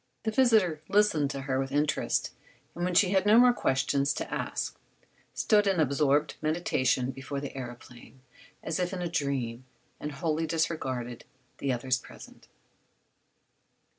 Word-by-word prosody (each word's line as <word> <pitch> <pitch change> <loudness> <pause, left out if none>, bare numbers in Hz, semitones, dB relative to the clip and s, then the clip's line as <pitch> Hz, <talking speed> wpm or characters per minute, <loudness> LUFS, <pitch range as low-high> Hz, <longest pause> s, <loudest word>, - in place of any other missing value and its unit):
The 220 - 0
visitor 215 - +3
listened 200 -9 +3
to 140 -1 -4
her 135 -1 -1
with 135 0 -3
interest, 145 +1 0 0.4
and 175 - -5
when 180 0 -1
she 185 +1 +5
had 190 -1 +3
no 210 +2 +5
more 245 0 +7
questions 140 - +1
to - - -5
ask - - -3 0.6
stood 210 -2 +3
in 190 -3 +2
absorbed 145 0 +2
meditation 130 -5 0
before 135 +2 -5
the 140 0 -5
aëroplane, 120 -1 -10 0.5
as 160 +2 -2
if 180 +1 -1
in 180 -1 -3
a - - -1
dream, 135 -7 -2 0.4
and 150 0 -5
wholly 160 +3 -1
disregarded 130 -7 -2 0.3
the 140 - -1
others 125 +1 0
present. - - -14
150 Hz, 145 wpm, -29 LUFS, 135-180 Hz, 0.6 s, more